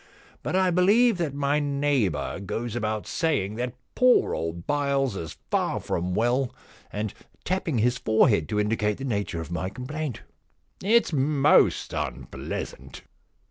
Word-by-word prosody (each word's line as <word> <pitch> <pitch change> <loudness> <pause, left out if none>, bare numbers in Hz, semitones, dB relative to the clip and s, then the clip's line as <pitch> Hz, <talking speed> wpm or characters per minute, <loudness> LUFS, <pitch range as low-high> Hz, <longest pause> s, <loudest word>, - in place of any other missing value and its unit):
But - - -2
I 185 -1 +3
believe 200 +4 +4
that 155 -5 -1
my 145 +1 +1
neighbour 140 - 0
goes 115 +4 -4
about 110 -2 -2
saying 145 - 0
that 125 0 -3 0.2
poor 255 0 +4
old 85 +1 -4
Byles 140 -5 +1
is 80 -4 -6
far - - +1
from 90 +1 -2
well, 120 +4 +1 0.4
and 105 0 -3 0.3
tapping 175 -6 -1
his 120 +3 +2
fore 110 +4 +4
head 90 - +1
to 105 - 0
indicate 105 0 0
the 135 - -7
nature 100 -8 -2
of 80 - -8
my 85 +2 -2
complaint. 135 +3 -5 0.6
It's 225 -2 +3
most 145 +1 +3
unpleasant. - - -5
125 Hz, 140 wpm, -26 LUFS, 105-150 Hz, 0.6 s, believe